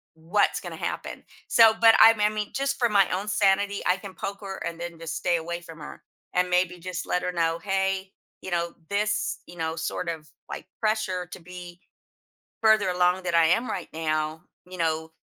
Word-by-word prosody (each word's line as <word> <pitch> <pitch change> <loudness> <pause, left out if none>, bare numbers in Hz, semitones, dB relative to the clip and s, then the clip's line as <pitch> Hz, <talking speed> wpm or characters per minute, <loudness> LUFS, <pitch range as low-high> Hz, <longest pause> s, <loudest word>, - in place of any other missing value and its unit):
what's 165 +6 +1
gonna - - -7
happen. - - -5 0.3
So 225 -2 +7
but 225 -1 +8
I 225 - +10
m 225 - -5
I 210 - +4
mean, 210 -1 -3
just 275 0 -1
for 240 - +4
my 200 -3 +4
own 195 +3 -2
sanity, 200 0 +2
I 180 - +4
can 195 -1 -10
poke 200 +2 -5
her 195 -1 -6
and 170 0 -5
then 170 -1 -6
just 165 -1 -5
stay 175 -1 +1
away 170 +1 -5
from 165 -2 -12
her, 150 - -10 0.3
and 180 0 +2
maybe 180 0 +1
just 180 0 -5
let 180 - 0
her 180 - -1
know, 165 -1 0
"Hey, 190 0 -1 0.3
you 190 - -7
know, 170 0 -1 0.2
this, 210 +1 0
you 175 - -12
know, 160 -1 -2
sort 170 +2 -3
of, 155 -3 -6 0.2
like, - - -7
pressure 215 -5 0
to - - -8
be 175 0 -10 0.8
further 220 -3 +4
along 180 +1 +2
than 175 -1 -1
I 165 -1 +6
am 230 +9 +2
right 180 - -4
now, 155 0 -2 0.3
you 185 - -9
know, 160 -1 -1
180 Hz, 205 wpm, -26 LUFS, 170-200 Hz, 0.8 s, I